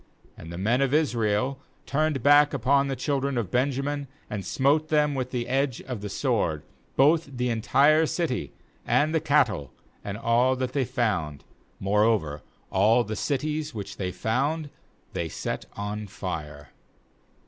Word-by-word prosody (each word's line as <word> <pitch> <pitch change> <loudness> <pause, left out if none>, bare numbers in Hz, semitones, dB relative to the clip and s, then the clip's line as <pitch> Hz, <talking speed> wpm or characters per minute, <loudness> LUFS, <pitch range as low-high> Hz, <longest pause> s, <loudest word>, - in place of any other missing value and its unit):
48And 80 - -9
the 85 - -7
men 115 +8 +1
of 135 +1 +2
Israel 125 -3 +1 0.3
turned 150 -3 0
back 145 0 +6
upon 140 +2 +2
the 135 - -2
children 140 0 -1
of 105 -6 -2
Benjamin, 140 +2 0 0.2
and 105 -2 -3
smote 140 - +2
them 150 -2 +2
with 130 -2 -2
the 120 -2 -3
edge 135 -1 0
of 125 -5 -6
the 105 - -5
sword, 100 - 0 0.3
both 155 +3 +4
the 125 0 0
entire 140 +8 +4
city, 160 -8 -2 0.3
and 155 +2 +2
the 160 - +3
cattle, 120 - +2 0.3
and 100 0 -5
all 120 +3 +2
that 130 0 -3
they 135 -3 +1
found; 105 - -1 0.4
moreover 100 -7 +1 0.3
all 110 +6 +4
the 110 0 -4
cities 150 +3 -2
which 100 -2 -6
they 90 -2 -2
found 140 - -1 0.4
they 85 -1 -2
set - - -4
on 105 +1 -4
fire. 75 -7 -6
125 Hz, 150 wpm, -26 LUFS, 105-145 Hz, 0.4 s, back